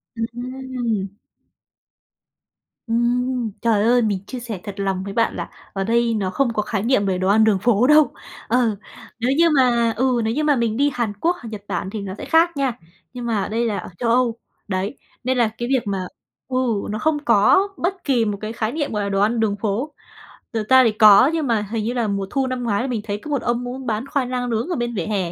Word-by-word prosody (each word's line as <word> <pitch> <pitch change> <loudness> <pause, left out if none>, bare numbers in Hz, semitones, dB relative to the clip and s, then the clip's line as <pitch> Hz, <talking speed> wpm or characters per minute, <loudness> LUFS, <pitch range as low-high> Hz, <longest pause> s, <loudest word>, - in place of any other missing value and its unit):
Ừ, 225 - -3
ừm. 245 -4 -3 1.8
Ừm, 240 0 0
trời 220 -3 +2
ơi! 240 +2 +4
Mình 210 -4 0
chia 255 - -6
sẻ 230 -5 -6
thật 205 - -6
lòng 195 -1 -1
với 200 0 -6
bạn 230 +2 +1
là - - -5 0.2
ở 195 - -2
đây 230 +2 +2
nó 200 -4 -1
không 240 +5 0
có 210 - 0
khái 210 -1 -2
niệm 230 -4 +2
về 190 -1 0
đồ 185 +1 -1
ăn 215 +3 +5
đường 215 -3 +3
phố 235 +3 +3
đâu. 300 0 +5 0.4
Ờ, 235 -3 +2 0.4
nếu 245 +3 +1
như 335 0 +5
mà 240 -5 +3
ừ, 250 -1 +2
nếu 220 +1 0
như 305 +4 -1
mà 295 -2 +3
mình 230 -2 0
đi 285 +2 +3
Hàn 235 -4 -1
Quốc 330 - 0
hoặc 230 - -8
Nhật 210 -2 -7
Bản 185 -1 -3
thì 210 +1 -5
nó 195 -1 -5
sẽ - - -7
khác 330 0 +3
nha, 270 -4 0 0.4
nhưng 245 -1 -6
mà 215 -5 0
đây 230 +2 0
là 215 -3 -1
ở - - -6
Châu 235 - 0
Âu. 235 -1 +2 0.3
Đấy, 200 +5 -2 0.3
nên 255 +1 0
là 235 - +4
cái 240 - -3
việc 255 -4 0
mà 190 -2 -2 0.4
ừ, 255 - -2 0.3
nó 215 +1 -3
không 315 -1 +1
có 235 - +4
bất 370 +1 -2
kỳ 250 -5 +2
một 205 -2 -2
cái 215 +1 -4
khái 220 -1 -2
niệm, 295 +1 -2
gọi 210 - -1
là, 200 - -2
đồ 195 0 0
ăn 225 +3 +2
đường 215 -2 +1
phố. 230 +8 -2 0.6
Thực 215 -2 -3
ra 260 0 +7
thì 230 - +3
có 215 +4 +7
nhưng 320 -3 -1
mà 230 -3 +2
hình 225 -2 -1
như 240 - -1
là 235 -3 0
mùa 200 -1 -2
thu 270 +2 0
năm 255 -1 -3
ngoái 215 -2 0
là 265 - -2
mình 235 -4 -2
thấy 205 -1 -3
có 260 - -10
một 280 - 0
ông 240 +1 -1
ông 245 - -4
ấy 265 - -7
bán 225 +1 -2
khoai 275 -3 -1
lang 250 -1 -2
nướng 230 +4 -1
ở 355 - -1
bên 240 -3 -2
vỉa - - -2
hè, 195 -5 -1
235 Hz, 245 wpm, -21 LUFS, 210-255 Hz, 1.8 s, ra